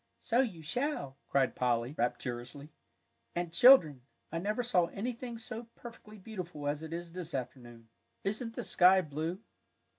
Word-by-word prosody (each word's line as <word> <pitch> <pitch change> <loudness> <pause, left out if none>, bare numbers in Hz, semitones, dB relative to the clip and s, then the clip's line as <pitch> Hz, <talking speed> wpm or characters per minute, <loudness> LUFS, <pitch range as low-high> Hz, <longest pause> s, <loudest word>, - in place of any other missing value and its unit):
"So 235 +1 +1
you 200 -11 0
shall," 155 - -2
cried 135 -2 +2
Polly, 120 +1 0
rapturously; 125 +3 -3 0.6
"and, 175 -1 -2
children, 175 - +7 0.3
I 165 - -2
never 210 +6 -1
saw 180 -8 +2
anything 235 +4 -5
so 230 +1 -6
perfectly 220 -3 -11
beautiful 180 -7 -6
as 145 +1 -1
it 160 0 -7
is 170 0 -6
this 175 -3 -5
afternoon! 120 -3 -7 0.4
Isn't 225 +3 -2
the - - -3
sky 185 +1 +5
blue!" 160 +4 -4
170 Hz, 145 wpm, -32 LUFS, 140-220 Hz, 0.6 s, children